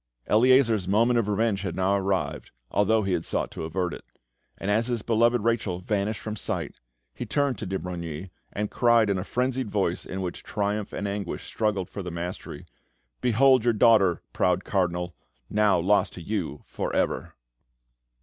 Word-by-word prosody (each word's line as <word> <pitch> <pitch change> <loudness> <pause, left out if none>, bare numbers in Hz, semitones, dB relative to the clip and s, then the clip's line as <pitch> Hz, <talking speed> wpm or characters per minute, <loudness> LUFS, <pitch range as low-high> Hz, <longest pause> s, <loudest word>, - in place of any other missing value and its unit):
Eleazar's 115 -3 +4
moment 115 +5 +3
of 110 - -1
revenge 105 -1 +1
had 95 -4 -3
now 95 +1 +2
arrived, 95 -7 -1 0.2
although 110 +2 +3
he 95 -1 0
had 85 -2 0
sought - - -2
to - - -5
avert 90 +2 -2
it; - - -9 0.5
and 100 - -2
as 110 +3 +2
his 120 -4 -1
beloved 120 +1 +3
Rachel 110 -6 0
vanished 100 +2 -1
from 110 -1 -4
sight, - - -4 0.3
he - - -5
turned 140 -7 0
to - - -4
de 95 +1 -1
Brogni, 85 -1 -6 0.2
and 105 0 -3
cried 120 -3 +4
in 95 - 0
a - - -3
frenzied 125 +1 -1
voice 95 -4 0
in 95 +1 -5
which 90 - -5
triumph 105 0 -2
and 100 - -3
anguish 100 -2 -4
struggled 105 -5 -1
for 100 - -6
the 90 - -5
mastery, 85 +1 -6 0.6
"Behold, 130 +1 +4
your 120 -1 +3
daughter, 105 -6 +4
proud 90 0 +1
Cardinal, 90 -2 -1 0.4
now 105 -3 +3
lost 100 +4 +2
to 90 - -9
you 85 -7 -3
for - - -4
ever!" - - -1
100 Hz, 175 wpm, -26 LUFS, 90-115 Hz, 0.6 s, Eleazar's